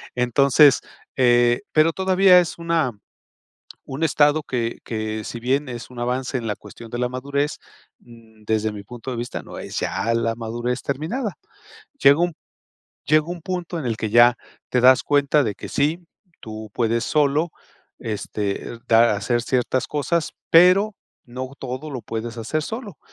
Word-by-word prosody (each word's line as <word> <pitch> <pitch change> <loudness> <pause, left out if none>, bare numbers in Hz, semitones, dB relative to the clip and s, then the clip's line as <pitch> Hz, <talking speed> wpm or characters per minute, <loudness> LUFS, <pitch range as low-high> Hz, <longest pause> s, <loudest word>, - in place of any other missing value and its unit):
entonces, 135 +3 +5 0.4
eh, 120 -2 +4
pero 155 +1 +4
todavía, 190 -1 +5
es 170 - -5
una 165 -5 0 1.0
un 135 +4 -6
estado, 150 0 +3
que 120 -4 -3
que 110 -1 -4
si 115 - -6
bien 135 +3 0
es 120 0 -7
un 125 - -12
avance, 125 +2 -1
en 115 - -6
la 105 -1 -2
cuestión 115 +1 -12
de 120 - -4
la 125 0 0
madurez, 140 +4 -2 0.4
desde 110 -2 -4
mi 105 -1 -8
punto 120 +3 -8
de 120 - -4
vista, 120 +1 -5
no - - -10
es - - -5
ya 115 +1 -1
la 115 0 0
madurez 120 +2 -3
terminada. 170 - -3 0.7
Llega 140 +3 +7
un 175 0 +1 0.7
llega 155 +2 +3
un 175 -1 -6
punto, 180 -1 -4
en 145 - -4
el 115 -2 -1
que 110 - -3
ya 120 +2 +6 0.3
te 125 - +2
das 130 +1 +6
cuenta, 145 0 +3
de 105 -3 -2
que - - -9
sí, 150 +5 0 0.4
tú 110 0 -8
puedes 115 -1 0
solo, 150 +2 +1 0.5
este, 105 +1 -4
dar 115 +1 +5
hacer 110 +4 0
ciertas 125 +1 0
cosas, 155 +3 -1 0.2
pero 185 +5 +5 0.3
no 130 +2 -7
todo, 130 +3 -6
lo 130 -3 -5
puedes 115 +1 -5
hacer 125 +7 -2
solo. 220 - -7
125 Hz, 160 wpm, -22 LUFS, 115-155 Hz, 1.0 s, Llega